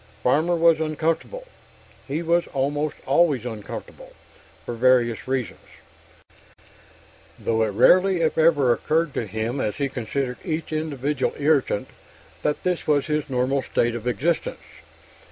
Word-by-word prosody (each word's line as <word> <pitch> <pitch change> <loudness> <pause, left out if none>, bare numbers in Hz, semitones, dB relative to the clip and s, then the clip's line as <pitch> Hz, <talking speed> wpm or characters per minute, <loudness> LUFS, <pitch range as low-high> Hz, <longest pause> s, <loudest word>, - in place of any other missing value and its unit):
Farmer 160 +7 +2
was 165 -1 +4
uncomfortable. 160 - -2 0.6
He 150 +4 -2
was 170 +1 +1
almost 145 +2 -1
always 140 -3 +2
uncomfortable, 110 -4 -8 0.5
for - - -4
various 120 -1 +2
reasons; 130 -4 -2 1.8
though 115 0 0
it 110 - +3
rarely 180 - +4
if 160 - +1
ever 150 -6 +4
occurred 155 +4 0
to 115 - -3
him, 110 +6 -3
as 105 - -2
he 140 -1 -1
considered 125 +1 -3
each 160 -2 -3
individual 145 -3 -2
irritant, 145 -7 +1 0.5
that 150 - -1
this 180 -2 -1
was 145 -2 +2
his 150 -2 -2
normal 130 +1 0
state 120 -2 0
of 120 0 -5
existence. 140 +9 -1
140 Hz, 130 wpm, -23 LUFS, 125-160 Hz, 1.8 s, was